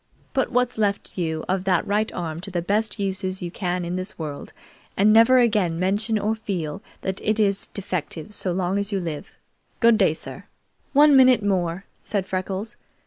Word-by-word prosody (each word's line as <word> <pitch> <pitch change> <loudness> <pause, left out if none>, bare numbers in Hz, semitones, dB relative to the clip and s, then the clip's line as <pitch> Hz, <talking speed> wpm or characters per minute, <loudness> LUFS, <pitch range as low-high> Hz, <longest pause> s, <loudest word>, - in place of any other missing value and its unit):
Put 265 - 0
what 250 0 +2
is - - -8
left 200 -2 -1
you 160 -3 -2
of 185 0 0
that 185 -3 +2
right 210 +2 0
arm 165 -2 -5
to 195 - -4
the 175 -2 -2
best 210 +4 0
uses 190 -1 -2
you 175 - -4
can 180 -1 -2
in 175 +1 -3
this 185 +2 -5
world, 150 -3 -6 0.5
and 210 +2 +5
never 230 +3 +6
again 210 -9 +2
mention 205 +5 +1
or 210 +1 0
feel 185 -9 -4 0.2
that 190 0 -3
it 215 +1 0
is 200 -2 +1
defective 185 -1 -4
so 185 - -1
long 185 +2 0
as 200 +1 -1
you 200 - 0
live. 165 -5 -6 0.4
Good 230 -1 +5
day, 175 -6 +3
sir!" - - -9 0.5
"One 295 0 +6
minute 255 -4 +6
more," 185 -2 -1 0.2
said 200 -4 -2
Freckles. 190 +4 -3
195 Hz, 190 wpm, -23 LUFS, 180-215 Hz, 0.5 s, never